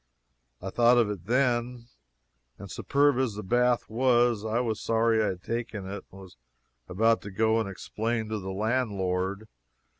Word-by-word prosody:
I 95 - -4
thought 120 +2 +4
of 115 -3 +3
it 95 -2 -8
then, 120 -1 0 0.7
and - - -10
superb 140 -2 +2
as 125 -6 0
the 105 - -6
bath 120 +4 +1
was, 120 -2 +2
I 110 +1 0
was 115 -3 -1
sorry 115 -1 +2
I - - +1
had 90 -2 -4
taken 115 -4 -4
it, 100 +2 -7
and 95 - -12
was 95 -2 -14 0.5
about 115 +5 +2
to 100 - -8
go 110 +3 +1
and 110 -3 -2
explain 110 +3 -3
to 110 -1 -2
the 95 -1 -6
landlord. 100 -2 -1
110 Hz, 170 wpm, -27 LUFS, 100-120 Hz, 0.7 s, thought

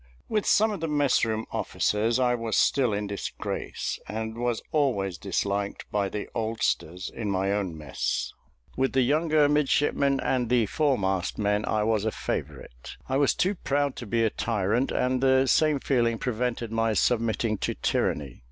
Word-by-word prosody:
With 210 -2 -1
some 220 +1 +4
of 205 - -4
the 165 - -2
mess 145 -3 +2
room 110 -1 -1
officers 110 +3 0
I 125 -1 +3
was 115 -2 -1
still 130 -4 +3
in 105 0 -1
disgrace, 100 -1 -4
and 110 +1 -4
was 120 -1 -2
always 100 - 0
disliked 100 +1 -2
by 100 -2 0
the 105 - -5
oldsters 110 -5 -1
in 110 -3 -4
my 95 0 0
own 100 -5 -2
mess; 75 -4 -3 0.4
with 135 0 0
the 130 -1 +4
younger 155 +2 +3
midshipmen 140 -1 +2
and 125 -3 0
the 120 -2 +3
foremast 100 - 0
men 105 0 +1
I 110 -1 +1
was 110 -1 +1
a 110 - 0
favourite. - - -6
I 130 - 0
was 140 -1 +3
too 190 +3 +1
proud 145 -6 -1
to 120 - -7
be 115 +2 +1
a 110 - +2
tyrant, 115 +3 0
and 130 0 0
the 130 0 +4
same 150 +1 +3
feeling 120 -4 +1
prevented 120 -1 -2
my 115 0 +1
submitting 110 0 +1
to - - -2
tyranny. 70 -5 -1
115 Hz, 170 wpm, -26 LUFS, 105-135 Hz, 0.4 s, some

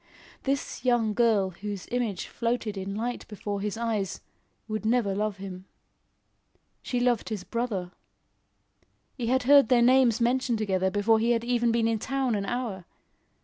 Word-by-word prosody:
This 275 +1 -2
young 240 -4 +2
girl 210 -4 +2
whose 200 +1 -6
image 240 -6 -1
floated 230 -2 -2
in 195 +1 -4
light 240 +3 -3
before 205 -1 -4
his 210 +1 -3
eyes, 220 -5 -2 0.5
would 215 -1 -3
never 220 -3 +2
love 210 0 -1
him. 190 -1 -8 1.2
She 245 - -2
loved 245 -3 +1
his 210 -4 -4
brother. 210 -6 -3 1.2
He 240 -4 -4
had 260 +1 +2
heard 280 -1 +6
their 240 -2 +5
names 250 -2 +5
mentioned 240 0 +1
together 190 -3 0
before 210 +3 +3
he 235 +2 +2
had 230 - -7
been 235 -1 +1
in 225 -1 0
town 265 0 -1
an 200 -2 -2
hour. 230 -7 -3
225 Hz, 150 wpm, -27 LUFS, 200-245 Hz, 1.2 s, heard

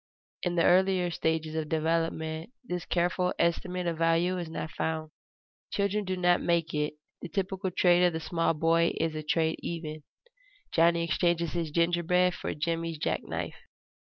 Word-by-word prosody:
In 175 -1 -1
the 170 - +3
earlier 185 -1 +4
stages 160 -1 -1
of 160 -1 -3
development, 160 +1 -1
this 180 -7 -4
careful 180 +1 0
estimate 180 +1 0
of 165 -2 -2
value 165 +2 +2
is 170 -2 -5
not 160 -1 -5
found. 160 -1 -3 0.6
Children 200 +1 0
do 185 0 -2
not 180 -1 +3
make 170 -1 +1
it. 150 0 -1 0.3
The 175 - -6
typical 190 +3 -2
trade 175 0 +4
of 175 - -1
the 160 - -2
small 165 0 0
boy 165 +2 +3
is 165 -1 0
a 155 - -4
"trade 160 +1 0
even"; 155 -2 -5 0.7
Johnny 170 0 +4
exchanges 170 -1 +1
his 170 -2 -1
gingerbread 175 +3 +2
for - - -4
Jimmie's 165 +1 -2
jack - - -1
knife. - - -5
170 Hz, 160 wpm, -29 LUFS, 160-180 Hz, 0.7 s, earlier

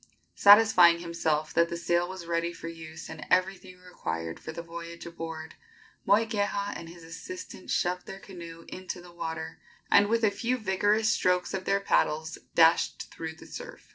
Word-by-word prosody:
Satisfying 200 -5 +7
himself 160 -3 -1
that 170 0 +3
the 170 - -3
sail 175 +1 +1
was 190 -2 -7
ready 170 0 -1
for 165 - -8
use 160 -1 -8
and 160 -1 -8
everything 185 0 +1
required 80 - -5
for - - -7
the 170 +1 -7
voyage 170 0 -8
aboard, 165 -1 -7 0.5
Moikeha 205 -1 +1
and 165 - -8
his 170 0 -12
assistant 165 - -9
shoved 180 +1 0
their 195 - -7
canoe 170 -4 -10
into 185 0 -6
the 175 0 -14
water, 160 -1 -5 0.3
and 205 0 +6
with 230 +1 +1
a 215 - +4
few 240 +5 -1
vigorous 210 +1 +2
strokes 180 -3 +1
of 190 -1 -3
their 200 - +2
paddles 160 -5 0 0.2
dashed 165 0 +3
through 160 -1 -6
the - - -14
surf. - - -10
170 Hz, 170 wpm, -28 LUFS, 165-195 Hz, 0.5 s, Satisfying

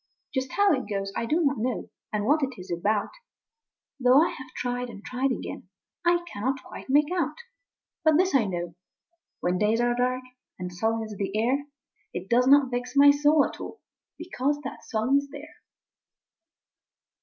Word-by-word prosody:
Just 260 -1 -2
how 405 -1 +4
it 260 -6 -2
goes, 195 -1 -3
I 230 - -2
do 320 +8 +2
not 275 -4 +1
know; 245 +1 -2 0.2
and 210 -1 -1
what 300 +5 +3
it 265 -3 -2
is 180 0 -9
about, 205 +5 0 0.9
Though 250 +1 +5
I - - -1
have 260 0 -9
tried 245 0 -2
and 205 -3 -11
tried 255 +2 0
again - - -5 0.3
I 345 0 +2
cannot 265 -1 -3
quite - - -10
make 295 +4 +4
out 305 -4 0 0.7
But 315 -1 +5
this 370 +2 +2
I 260 -5 +4
know: 175 -2 -4 0.7
when 180 +1 0
days 215 +2 +2
are 240 0 +2
dark, 250 +1 0 0.3
and 180 -1 -6
sullen 225 +4 0
is 215 -1 -7
the 195 +1 -2
air, 260 +6 +1 0.5
It 180 +2 -5
does 250 +2 +4
not 275 -1 +6
vex 245 +2 -3
my 285 0 +8
soul 295 +1 +4
at - - -7
all, - - -8 0.4
because 290 -4 -1
that 270 - -7
song 230 +5 +1
is 280 0 -8
there! 295 +2 -11
255 Hz, 180 wpm, -26 LUFS, 220-285 Hz, 0.9 s, my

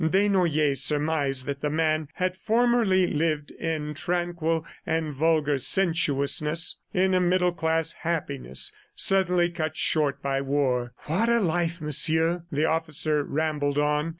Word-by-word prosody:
Desnoyers 160 -6 +2
surmised 145 -3 0
that 140 0 -5
the 150 - -1
man 155 0 0
had 185 0 -1
formerly 225 -3 +2
lived 155 -2 -1
in 155 -2 -4
tranquil 170 0 -2 0.2
and 160 -2 -2
vulgar 150 -1 +1
sensuousness, 155 -1 +2
in 190 +1 +1
a 185 - +3
middle 180 0 +2
class 165 -1 0
happiness 140 - -2 0.2
suddenly 180 -2 +2
cut 155 -2 -4
short 145 -3 0
by 135 -1 -1
war. 130 -3 -1
"What 190 +10 0
a 235 0 +3
life, 170 -2 -1
Monsieur!" 160 +3 +1
the 150 +2 +1
officer 155 -2 0
rambled 145 -1 -1
on. 150 +2 +1
160 Hz, 130 wpm, -25 LUFS, 145-175 Hz, 0.2 s, a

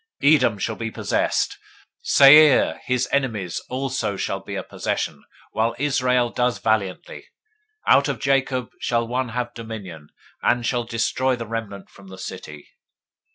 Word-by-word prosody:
024:018 150 +2 +7
Edom 115 -7 +1
shall 110 +3 -3
be 115 - -4
a - - -6
possession. - - -1 0.5
Seir, 145 0 +6
his 125 0 0
enemies, 110 -11 -1
also 130 -6 -2
shall - - -2
be - - -8
a - - -3
possession, - - -4 0.3
while 115 +1 0
Israel 125 -3 +1
does 125 -1 0
valiantly. 110 -4 -2 0.6
024:019 - - +7
Out 140 +2 +4
of 145 - -3
Jacob 135 -3 0
shall 115 -1 0
one 125 +1 -2
have 120 +1 -4
dominion, 100 -9 -8 0.3
and 120 -1 +1
shall 120 -1 -1
destroy 120 +3 0
the 120 -1 -6
remnant 105 -3 -6
from 100 -1 -16
the 95 0 -11
city. 80 -6 -9
120 Hz, 155 wpm, -22 LUFS, 110-130 Hz, 0.6 s, 024:018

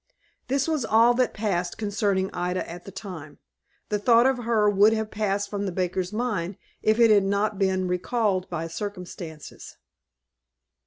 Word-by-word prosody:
This 275 +3 0
was 310 -5 0
all 225 +2 +5
that 250 -1 +1
passed 185 -5 -2
concerning 205 -3 0
Ida 180 +1 -2
at 175 +1 -9
that 195 - -11
time. 175 -7 -8 0.5
The 210 - 0
thought 235 +3 +5
of 265 -1 +2
her 220 -3 +3
would 205 +2 +5
have 220 -1 -2
passed 205 -1 -1
from 200 0 -3
the - - -2
baker's 180 +1 -2
mind, 210 -6 -2 0.2
if 215 +2 +2
it 230 -2 +6
had 205 -2 +5
not 200 +1 0
been 190 -1 +1
recalled 185 +1 0
by 165 -2 -3
circumstances. 180 -4 -8
200 Hz, 160 wpm, -25 LUFS, 185-220 Hz, 0.5 s, it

